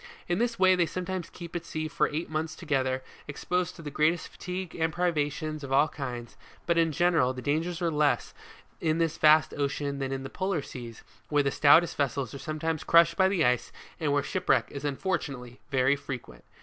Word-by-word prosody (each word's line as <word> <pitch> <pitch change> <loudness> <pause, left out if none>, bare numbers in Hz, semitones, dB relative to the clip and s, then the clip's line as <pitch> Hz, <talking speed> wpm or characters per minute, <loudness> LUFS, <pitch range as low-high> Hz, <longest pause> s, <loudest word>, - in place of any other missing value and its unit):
In 175 +2 0
this 235 0 0
way, 185 -1 +5
they 175 -2 +2
sometimes 185 +1 -4
keep 170 -1 -10
at 170 - -2
sea 155 -1 -4
for 155 -1 +1
eight 155 +3 -3
months 155 0 -3
together, 130 -5 -1 0.2
exposed 180 +5 -2
to 165 - -11
the 145 - -6
greatest 155 +4 +1
fatigue 180 -2 -6
and 160 -1 0
privations 155 -2 -1
of 135 - -6
all 140 +3 +5
kinds; 125 -6 -6 0.3
but 170 - +2
in 165 -1 +3
general, 165 -6 +2
the 130 - -7
dangers 165 +4 -1
are 170 - +1
less 150 -1 +1 0.5
in 160 -1 +1
this 165 -2 0
vast 155 0 +5
ocean 140 0 -2
than 135 -1 -2
in 135 0 -3
the 135 - -6
polar 185 -6 -1
seas, 120 -4 -9 0.3
where 145 -1 +3
the 140 - +1
stoutest 160 +5 +5
vessels 140 -3 -1
are 140 - -7
sometimes 155 +1 -3
crushed 170 0 +5
by 190 -1 +4
the 185 -5 +2
ice, 125 -1 +1 0.3
and 155 -3 0
where 145 0 +2
shipwreck 185 -1 +1
is 140 0 -7
unfortunately 140 -5 -3
very 135 0 +3
frequent. 130 - -8
155 Hz, 200 wpm, -28 LUFS, 140-170 Hz, 0.5 s, way